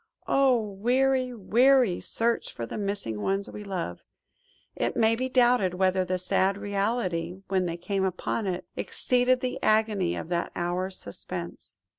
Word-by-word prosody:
Oh! 270 -3 +4
weary, 250 +5 +1
weary 240 -1 +3
search 230 +1 0
for 115 - -5
the 115 - -6
missing 200 - -3
ones 195 - -1
we 210 - -8
love! 180 - -4 0.7
It 120 - -1
may 225 0 +3
be 255 +2 -2
doubted 245 -8 +3
whether 185 0 +2
the 185 0 -1
sad 190 +2 +1
reality, 200 -4 -1
when 185 -2 +1
they 170 0 -3
came 195 +2 -2
upon 190 +3 -2
it, 180 -1 -3
exceeded 250 0 +1
the 255 -1 -3
agony 215 -4 +2
of - - -5
that 170 -1 -1
hour's 180 +2 -2
suspense. 170 - -7
200 Hz, 150 wpm, -27 LUFS, 180-240 Hz, 0.7 s, Oh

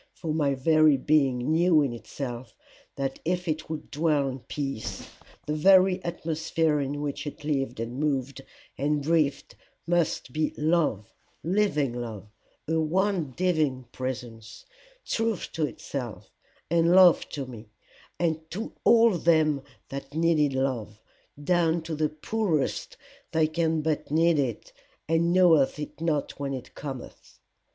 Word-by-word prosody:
for 160 -3 -3
my 145 -3 +1
very 155 +1 +4
being 135 -2 +2
knew 165 -1 +4
in 135 -4 -1
itself 120 +2 -7 0.4
that 135 -1 -3
if 180 +2 -1
it 155 -1 -2
would 160 -1 -6
dwell 150 -2 +1
in 130 0 -4
peace, 135 -3 -5 0.3
the 150 - -2
very 185 +3 +5
atmosphere 160 -2 -1
in 145 +1 -3
which 145 +1 -4
it 145 - -8
lived 135 -5 -1
and 120 +3 -4
moved 140 -2 -1 0.4
and 145 +1 0
breathed 150 -3 +1 0.3
must 170 -6 0
be 155 0 -1
love, 150 - 0 0.3
living 170 - +1
love, 115 -5 -6 0.4
a 160 +1 +1
one 175 -1 0
divine 155 -8 +1
presence, 120 -3 -6 0.4
truth 225 -3 -1
to 155 -2 0
itself, 125 -6 -7 0.4
and 170 0 +3
love 185 -3 +6
to 140 -2 -4
me, 115 -4 -11 0.5
and 160 -2 -1
to 215 +6 -5
all 230 0 +6
them 155 -4 +3 0.3
that 140 +1 -7
needed 160 -3 +2
love, 120 -6 -2 0.4
down 170 0 +2
to 160 0 -6
the 155 0 0
poorest 160 -1 -2 0.4
that 160 -1 +2
can 160 -1 +1
but 155 -1 -1
need 165 +1 +3
it, 125 -6 -3 0.3
and 165 +2 +2
knoweth 170 -7 +4
it 150 +1 -7
not 155 -5 -1
when 140 -1 -2
it 125 -1 -9
cometh. 135 -4 -9
150 Hz, 140 wpm, -27 LUFS, 135-165 Hz, 0.5 s, love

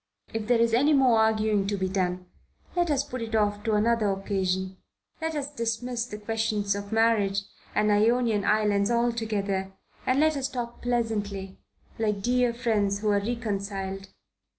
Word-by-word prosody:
If 220 -1 -3
there 245 0 +4
is 230 0 +2
any 285 +6 +4
more 255 -5 +5
arguing 215 -2 +2
to 205 0 -1
be 190 0 -1
done, 185 -1 -1 0.5
let 350 -1 +1
us 280 -2 +2
put 255 -3 -6
it 225 -1 -3
off 205 -1 +1
to 220 - +1
another 220 0 +2
occasion. 190 -1 -1 0.4
Let 320 0 -2
us 290 0 -3
dismiss 235 0 -2
the 210 - -7
questions 215 -1 -1
of 200 +1 -6
marriage 220 -3 +2 0.3
and 210 0 +3
Ionian 220 0 +3
islands 205 -1 +2
altogether, 215 -5 -1 0.3
and 255 +2 +3
let 310 0 +3
us 270 -1 -2
talk 240 -3 -5
pleasantly 205 -5 -2 0.4
like 210 -3 0
dear 245 +1 +2
friends 215 -4 0
who 215 - +1
are 205 -1 +3
reconciled." 200 -3 -3
220 Hz, 160 wpm, -27 LUFS, 200-235 Hz, 0.5 s, more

